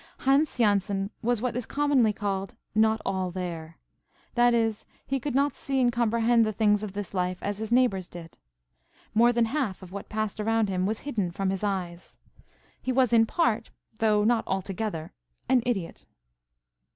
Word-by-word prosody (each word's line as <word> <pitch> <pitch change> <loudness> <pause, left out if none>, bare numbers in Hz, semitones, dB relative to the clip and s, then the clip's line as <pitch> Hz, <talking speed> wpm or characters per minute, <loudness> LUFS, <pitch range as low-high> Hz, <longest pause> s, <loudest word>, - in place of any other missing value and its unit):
Hans 275 +2 +2
Jansen 200 -2 +1
was 240 0 0
what 250 -2 -1
is 245 -2 -3
commonly 280 -6 +2
called 195 -1 -3 0.2
not 220 0 +3
all 190 -1 -1
there; 170 -3 -6 0.6
that 240 0 +4
is, 225 -2 +1 0.2
he 270 0 -1
could 275 0 -3
not 280 0 +2
see 275 -1 -2
and 245 -1 +3
comprehend 235 0 +3
the 215 - 0
things 210 -1 +2
of 210 -3 -5
this 200 -1 -5
life 180 -1 -1
as 205 0 -3
his 220 0 -5
neighbours 235 -8 +2
did. 165 -2 -11 0.7
More 235 +2 +5
than 235 -1 +2
half 225 -7 -2
of 180 - -11
what 200 +1 -7
passed 215 -1 -2
around 225 0 +1
him 185 0 0
was 220 +1 -2
hidden 220 -10 -2
from 190 +2 -2
his 195 +1 -4
eyes. 180 -4 -4 0.6
He 260 - -1
was 255 -2 +2
in 225 -1 +5
part, 235 -9 0 0.3
though 215 -2 +3
not 230 +1 +2
altogether, 190 -3 -3 0.3
an 255 -2 +4
idiot. 195 -9 -3
215 Hz, 175 wpm, -27 LUFS, 195-240 Hz, 0.7 s, More